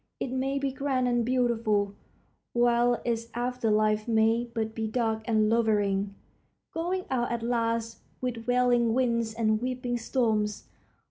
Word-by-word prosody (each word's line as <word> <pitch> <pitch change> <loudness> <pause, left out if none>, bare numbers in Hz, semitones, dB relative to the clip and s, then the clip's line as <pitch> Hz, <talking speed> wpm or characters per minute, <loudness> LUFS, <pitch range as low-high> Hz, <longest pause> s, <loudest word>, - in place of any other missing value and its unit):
It 255 - -3
may 265 +2 -1
be 275 -1 -1
grand 265 -2 0
and 240 -1 +2
beautiful, 225 -5 +1 0.6
while 240 0 +3
its 230 -1 -1
after 245 -1 -1
life 215 0 +2
may 225 +1 +3
but 220 -2 -2
be 220 -1 -2
dark 220 -1 0
and 220 -2 +2
lowering, 205 -3 +1 0.6
going 360 +3 -2
out 240 -2 0
at 235 -1 -2
last 230 -1 -1 0.2
with 240 -2 -4
wailing 245 -2 +3
winds 235 -3 +1
and 215 -1 +1
weeping 250 -1 -2
storms. 220 -3 0
235 Hz, 140 wpm, -28 LUFS, 220-250 Hz, 0.6 s, while